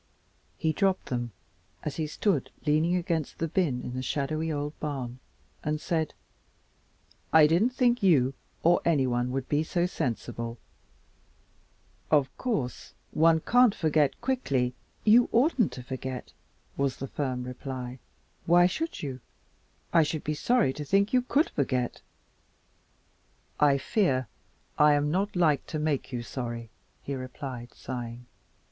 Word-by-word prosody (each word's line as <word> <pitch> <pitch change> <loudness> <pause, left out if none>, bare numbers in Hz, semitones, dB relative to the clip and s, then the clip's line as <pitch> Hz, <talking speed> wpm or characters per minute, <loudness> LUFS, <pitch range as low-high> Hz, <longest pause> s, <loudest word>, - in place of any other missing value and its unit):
He 160 -1 0
dropped 195 0 +1
them, 120 -2 -2 0.5
as 150 - -4
he 155 -2 -1
stood 195 +6 0 0.2
leaning 155 +4 +3
against 170 -4 -1
the 165 - -1
bin 150 -8 0
in 125 - -5
the 130 - -3
shadowy 155 +4 -1
old 145 0 -2
barn, 130 -5 -4 0.4
and 150 0 -1
said, 160 -2 -1 1.2
"I 160 -1 +8
didn't 170 +10 +3
think 250 -1 +2
you 140 -9 +4 0.3
or 175 +1 +5
anyone 125 -6 +2
would 130 0 -3
be 145 +1 +2
so 175 +2 0
sensible. 115 - -3 1.5
Of 140 -3 +2
course, 210 - -3 0.2
one 160 0 +4
can't 245 0 +4
forget 155 -3 +2
quickly 135 - 0 0.2
" - - -38
"You 240 +1 +6
oughtn't 245 - +3
to 125 - -7
forget," 130 0 -6 0.4
was 140 -1 0
the 135 - -5
firm 130 -3 -2
reply. 125 0 -6 0.5
"Why 175 +1 +6
should 320 - -2
you? 130 -3 -4 0.7
I 165 - +7
should 155 0 -1
be 155 - -1
sorry 215 - +2
to 150 - -5
think 200 - +2
you 250 - +5
could 280 +5 +1
forget." 130 -3 -1 1.6
"I 145 -2 +5
fear 135 - +1 0.5
I'm 150 0 +5
not 195 +4 0
like 160 -5 +2
to 155 - -3
make 150 -3 -1
you 120 -2 -3
sorry," 115 -2 -5 0.3
he 140 - -4
replied, 130 -1 -6
sighing. 120 -1 -6
150 Hz, 140 wpm, -28 LUFS, 130-175 Hz, 1.6 s, I